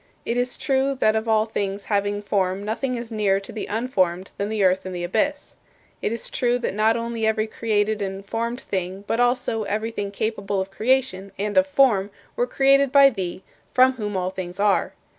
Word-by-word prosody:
It 235 - -1
is 245 0 -1
true 270 0 +1
that 215 -4 +2
of 220 +1 -1
all 220 -1 +3
things 200 -2 -3
having 205 0 0
form 195 -1 0
nothing 250 +4 -2
is 235 -1 -6
nearer 205 -3 +2
to 195 - -9
the 220 - -5
unformed 195 -6 -1
than 200 +1 -1
the 215 -2 0
earth 190 0 +3
and 185 -1 -6
the 175 - -4
abyss. 255 +11 -1 0.4
It - - -1
is 230 - -4
true 245 -1 +1
that 245 - -3
not 220 +3 +2
only 230 -1 -2
every 220 0 +1
created 215 -1 0
and 195 0 -4
formed 235 +3 -3
thing 190 +1 -4
but 225 - -1
also 245 -2 +1
everything 210 0 -2
capable 200 -1 -2
of 190 +1 -3
creation 220 -4 0
and 205 +1 -2
of 280 0 +5
form 250 -9 +3 0.3
were 245 - 0
created 275 +1 +4
by 280 -1 +7
Thee, 185 -4 -5 0.3
from 255 +1 +6
whom 210 -5 -3
all 185 0 -1
things 185 0 -6
are. 205 -1 +2
215 Hz, 200 wpm, -23 LUFS, 195-245 Hz, 0.4 s, by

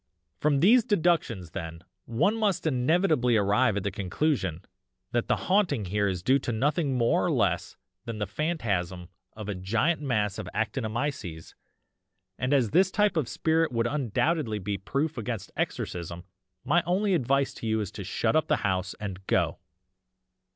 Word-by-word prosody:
"'From 145 -2 +2
these 230 +6 +6
deductions 165 - +1
then, 80 -2 -6 0.2
one 120 - +1
must 210 -7 0
inevitably 145 - +2
arrive 105 +2 +2
at 100 - -2
the 100 - -1
conclusion 95 - -1 0.5
that 120 -1 0
the - - +3
haunting 180 - +1
here 100 +2 0
is 90 -2 -2
due 135 +5 +4
to 125 - -3
nothing 140 +3 0
more 125 +9 +2
or 180 - +1
less 100 - 0 0.3
than 115 -2 -5
the 105 - -1
phantasm 95 - -2 0.2
of 105 -1 -8
a 105 - -2
giant 105 - 0
mass 105 -8 0
of - - -5
ACTINOMYCES 110 - -3 0.9
and 125 +1 -1
as 130 -7 +3
this 185 +2 +4
type 210 0 +2
of 150 -7 0
spirit 160 -1 +1
would 115 -1 0
undoubtedly 140 -1 0
be 100 0 -3
proof 135 +9 -2
against 115 -3 -4
exorcism 85 0 -3 0.4
my 175 - +3
only 195 +3 +2
advice 140 -3 +1
to 115 - -6
you 110 0 +1
is 105 -4 -3
to - - -7
shut - - 0
up - - +2
the - - +3
house 95 -1 -1
and 95 -2 -6
go. - - +1
120 Hz, 165 wpm, -27 LUFS, 100-155 Hz, 0.9 s, these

